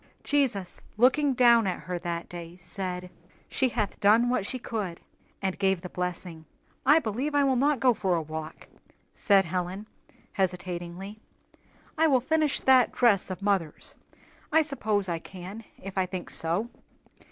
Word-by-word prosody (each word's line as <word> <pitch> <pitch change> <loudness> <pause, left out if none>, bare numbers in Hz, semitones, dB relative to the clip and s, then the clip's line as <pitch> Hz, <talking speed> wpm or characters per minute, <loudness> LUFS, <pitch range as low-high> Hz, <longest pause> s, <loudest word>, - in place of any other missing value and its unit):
Jesus, 240 -11 -1 0.2
looking 265 +4 +4
down 235 -3 +5
at 185 - -2
her 180 -1 -4
that 170 -1 -4
day, 170 0 -9
said, 180 0 -6 0.4
"She 260 - +1
hath 220 -4 -2
done 225 +4 +4
what 205 -5 0
she 260 - -3
could," 210 -8 -4 0.4
and 190 -1 -2
gave 190 -3 +2
the 180 - -8
blessing. 180 -2 -5 0.4
"I 295 +3 +7
believe 265 +3 -1
I 285 - +4
will 270 -1 +2
not 280 +2 +2
go 250 0 +4
for 190 -5 0
a 165 - 0
walk," 155 0 -7 0.5
said 195 -2 +3
Helen, 180 +4 -3 0.5
hesitatingly. 180 +1 -3 0.8
"I 320 - +5
will 265 -4 +4
finish 305 +3 +1
that 260 -2 +5
dress 215 -7 +3
of 185 +1 -6
mother's; 190 -7 0 0.6
I 320 +1 +5
suppose 215 -9 0
I 170 -2 -2
can 190 +6 -9
if 195 0 -8
I 185 - +1
think 185 -1 -6
so." 180 +9 0
195 Hz, 155 wpm, -27 LUFS, 180-245 Hz, 0.8 s, I